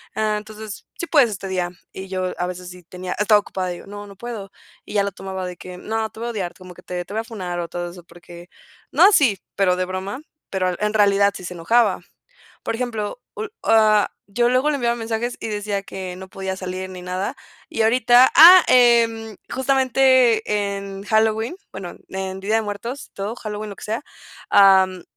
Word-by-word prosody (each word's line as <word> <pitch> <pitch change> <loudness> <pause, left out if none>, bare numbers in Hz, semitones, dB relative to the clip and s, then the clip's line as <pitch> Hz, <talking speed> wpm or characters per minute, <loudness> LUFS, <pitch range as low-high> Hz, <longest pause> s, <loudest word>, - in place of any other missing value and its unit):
Ah, 215 -1 0
entonces, 215 0 -9
sí - - -3
puedes 275 -9 +4
este 195 -1 -6
día, 180 -2 -1 0.2
y 190 0 -7
yo 185 -1 -2
a 180 - -1
veces 180 0 -7
sí 180 0 -12
tenía 180 +1 -7
estaba 210 0 +5
ocupada 185 -2 -4
y - - -4
digo: - - -13
"No, 205 0 -8
no 200 - -13
puedo." 220 -4 -7 0.3
Y - - -9
ya 200 - +3
lo 200 - -2
tomaba 190 -1 -6
de 180 -1 -8
que, 180 0 -10
no 220 +3 -3
te - - -13
voy 235 - -3
a 235 - -2
odiar 185 -6 -4
como 185 -1 -12
que - - -14
te 180 -1 -4
te 200 - -10
voy 220 - -1
a - - -12
funar 185 -6 -5
o 170 - -3
todo 175 0 -5
eso 175 0 -13
porque 175 0 -14 0.4
no - - +4
así, 290 - +5 0.2
pero 190 -2 +3
de 185 - 0
broma, 190 +7 -5 0.3
pero 185 -2 -1
en 210 +1 0
realidad 200 -1 +4
sí 185 - -8
se 180 - -6
enojaba. 205 +4 +2 0.6
Por 230 - -2
ejemplo, 225 -1 -4 0.4
ah, 215 -2 +4 0.2
yo 240 +2 +3
luego 255 +4 +2
le - - 0
enviaba 235 -3 0
mensajes 230 +1 -3
y - - -5
decía: 205 -1 -3
"Que 185 -2 -7
no 190 0 -9
podía 190 0 -4
salir 185 0 -5
ni 185 -1 -9
nada", 185 +2 -3 0.3
y 225 - -2
ahorita. 245 +2 +5
Ah, 350 +3 +10
em, 230 -3 +4 0.2
justamente 260 -3 +3 0.3
en 195 0 -7
Halloween, 220 - +1 0.2
bueno, 185 -2 -8
en 190 0 -5
día 205 +3 0
de 225 - +3
muertos, 230 +6 -6
todo 200 +3 -4
Halloween, 215 -2 -6
lo - - -8
que - - -13
sea. 220 +4 -2 0.5
Am, 190 -2 +5
205 Hz, 205 wpm, -21 LUFS, 185-225 Hz, 0.6 s, Ah